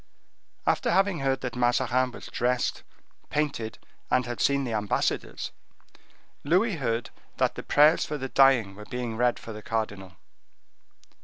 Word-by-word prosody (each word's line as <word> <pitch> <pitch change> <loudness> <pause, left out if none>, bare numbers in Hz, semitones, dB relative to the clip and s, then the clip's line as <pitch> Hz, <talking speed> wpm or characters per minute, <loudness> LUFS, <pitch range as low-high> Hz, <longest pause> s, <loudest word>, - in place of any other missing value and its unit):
After - - +1
having 195 -3 +2
heard 135 -1 0
that 125 -2 -4
Mazarin 125 +1 +2
was - - -10
dressed, 125 +1 -1 0.5
painted, 140 -7 -2 0.3
and 125 - +2
had 120 -1 -4
seen 140 0 +2
the 120 -3 -3
ambassadors, 105 -2 -1 0.9
Louis 185 +6 +2
herd 115 -4 -2 0.3
that - - +2
the - - -6
prayers 150 +3 +5
for 150 - -3
the 135 -1 -5
dying 130 -8 +4
were 105 +2 -11
being 120 0 -4
read 120 +1 +2
for 115 - -8
the 105 - -8
cardinal. 105 -4 -3
125 Hz, 145 wpm, -27 LUFS, 115-140 Hz, 0.9 s, prayers